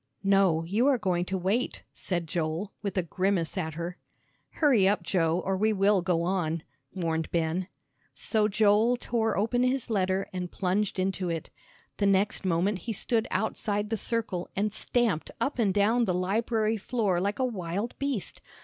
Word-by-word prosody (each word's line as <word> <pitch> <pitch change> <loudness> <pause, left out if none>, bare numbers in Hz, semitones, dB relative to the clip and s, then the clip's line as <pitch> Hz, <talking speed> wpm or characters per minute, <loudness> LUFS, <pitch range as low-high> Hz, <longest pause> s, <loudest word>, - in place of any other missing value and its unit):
"No, 195 -5 +3
you 210 +10 +1
are 275 -3 +4
going 180 -5 0
to 190 +1 -2
wait," 195 +8 -1
said 175 -3 -3
Joel, 165 +4 -2
with 200 -2 -4
a 185 - +2
grimace 185 -1 0
at 160 -5 -3
her. 170 +2 -5 0.5
"Hurry 255 -11 +3
up, 205 - 0
Joe, 170 -1 +1
or 195 - +1
we 215 +3 +2
will 200 -1 +3
go 170 -1 +1
on," 170 -3 -1 0.3
warned 165 -3 -1
Ben. 170 +2 -1 0.5
So 215 -2 +1
Joel 215 +3 +3
tore 225 -2 0
open 230 +4 +1
his 255 -1 0
letter 190 -1 +1
and 180 -1 -4
plunged 195 +2 0
into 185 -1 -1
it. 165 -1 -4 0.5
The 200 - +2
next 195 +2 +2
moment 185 +3 +1
he 230 - -4
stood 225 +2 0
outside 210 -1 -1
the - - +2
circle 220 -5 -2
and 205 +1 0
stamped 225 -7 0
up 275 -2 -1
and 210 -4 +3
down 220 +5 +3
the 180 -4 0
library 220 +4 0
floor 205 -4 0
like 200 +2 -1
a 260 - +1
wild 200 0 -3
beast. 275 -8 -2
195 Hz, 170 wpm, -28 LUFS, 180-220 Hz, 0.5 s, are